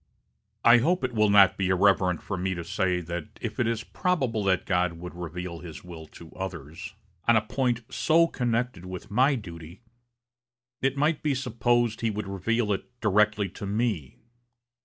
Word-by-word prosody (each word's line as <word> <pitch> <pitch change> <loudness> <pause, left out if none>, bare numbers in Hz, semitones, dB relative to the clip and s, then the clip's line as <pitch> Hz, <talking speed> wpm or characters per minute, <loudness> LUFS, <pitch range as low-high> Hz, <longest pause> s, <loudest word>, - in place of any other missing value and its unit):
I 120 +1 +8
hope 175 +8 +1
it 125 -1 -1
will 105 -2 +3
not 100 -2 +6
be 95 - +1
irreverent 95 -2 +3
for 100 - -3
me 95 +1 -2
to 85 - -5
say 90 0 0
that 85 -1 -5
if - - -5
it 120 - +2
is 115 -1 -1
probable 130 - -1
that 95 -1 +2
God 90 -2 +1
would 90 +1 -8
reveal 90 0 -6
his 85 -3 -10
will 85 -3 -10
to 80 +1 -14
others, 95 +1 -7 0.3
on 120 - +6
a 110 - +4
point 120 +2 -1
so 165 +1 +4
connected 120 - -2
with 90 +3 -8
my 130 +6 +4
duty, 85 -3 -9 1.0
it 135 +1 0
might 150 +2 +1
be 145 -3 0
supposed 120 -2 0
he 115 - +1
would 105 -1 -4
reveal 105 +3 0
it 120 +5 -7
directly 105 -1 +2
to 100 +2 -7
me.... 100 - -2
100 Hz, 175 wpm, -27 LUFS, 90-120 Hz, 1.0 s, I